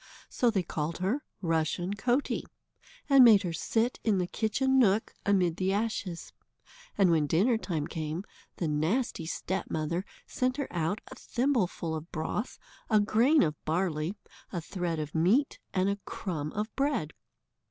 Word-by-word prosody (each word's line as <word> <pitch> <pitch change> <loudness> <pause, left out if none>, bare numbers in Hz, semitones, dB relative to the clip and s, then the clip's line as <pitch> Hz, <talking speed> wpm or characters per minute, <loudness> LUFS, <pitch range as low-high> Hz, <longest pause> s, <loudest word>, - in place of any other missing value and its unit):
So 245 - +2
they 200 -5 +1
called 160 0 -3
her 200 +10 0 0.2
Rushen 165 +3 0
Coatie, 245 +7 0 0.6
and 275 -2 +8
made 220 -5 +7
her 175 -2 -2
sit 230 +8 0
in 215 -4 +2
the 180 - +1
kitchen 265 +8 +1
nook, 215 -2 +3
amid 180 -5 +3
the 190 0 +1
ashes. 200 -4 -2 0.6
And 190 -3 +5
when 155 -3 +3
dinner 200 - +3
time 170 -9 -2
came, 160 +1 -4 0.3
the 170 - -1
nasty 160 - 0
stepmother 170 -1 -2 0.2
sent 255 +1 -1
her 280 - -2
out 170 +5 -1
a - - -5
thimbleful 230 - -1
of 160 +2 -6
broth, 170 +8 -3 0.3
a 215 -2 +5
grain 235 +9 +4
of 150 -2 -2
barley, 165 +1 -1 0.4
a 180 - -2
thread 175 -1 -3
of 150 -1 -4
meat, 200 - +2
and 185 -1 +1
a 200 0 0
crumb 170 -10 -4
of 210 +2 -3
bread. 270 - 0
190 Hz, 155 wpm, -29 LUFS, 165-225 Hz, 0.6 s, and